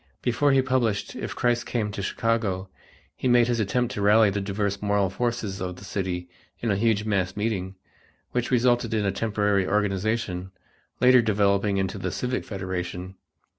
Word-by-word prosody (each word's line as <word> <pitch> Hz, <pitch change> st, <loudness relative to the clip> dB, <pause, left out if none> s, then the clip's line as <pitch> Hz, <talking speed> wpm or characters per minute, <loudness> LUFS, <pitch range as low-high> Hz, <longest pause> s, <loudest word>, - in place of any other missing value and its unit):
Before 125 Hz, +4 st, +2 dB
he 135 Hz, -1 st, +4 dB
published 125 Hz, -6 st, 0 dB
"If -, -, -5 dB
Christ 120 Hz, -1 st, +1 dB
Came 110 Hz, -4 st, -1 dB
to 100 Hz, -, -5 dB
Chicago" 100 Hz, -3 st, -1 dB, 0.5 s
he -, -, -2 dB
made 120 Hz, -1 st, +5 dB
his 120 Hz, -1 st, 0 dB
attempt 120 Hz, +4 st, 0 dB
to 105 Hz, -, -3 dB
rally 105 Hz, +1 st, +5 dB
the 100 Hz, +1 st, -2 dB
diverse 100 Hz, 0 st, -2 dB
moral 100 Hz, -2 st, +1 dB
forces 110 Hz, -3 st, -2 dB
of 90 Hz, -1 st, -3 dB
the 95 Hz, -, -13 dB
city 95 Hz, -3 st, -3 dB, 0.3 s
in 115 Hz, -, -1 dB
a -, -, +2 dB
huge 105 Hz, 0 st, +1 dB
mass 95 Hz, -3 st, 0 dB
meeting, 100 Hz, -3 st, -2 dB, 0.6 s
which 125 Hz, 0 st, -1 dB
resulted 120 Hz, -2 st, +2 dB
in 105 Hz, -2 st, +1 dB
a 100 Hz, -, +2 dB
temporary 105 Hz, -2 st, 0 dB
organization, 100 Hz, -2 st, -1 dB, 0.5 s
later 125 Hz, 0 st, +6 dB
developing 100 Hz, -2 st, +2 dB
into 95 Hz, -1 st, -2 dB
the -, -, -2 dB
Civic 130 Hz, +1 st, -2 dB
Federation. 95 Hz, -1 st, -4 dB
105 Hz, 170 wpm, -25 LUFS, 95-115 Hz, 0.6 s, later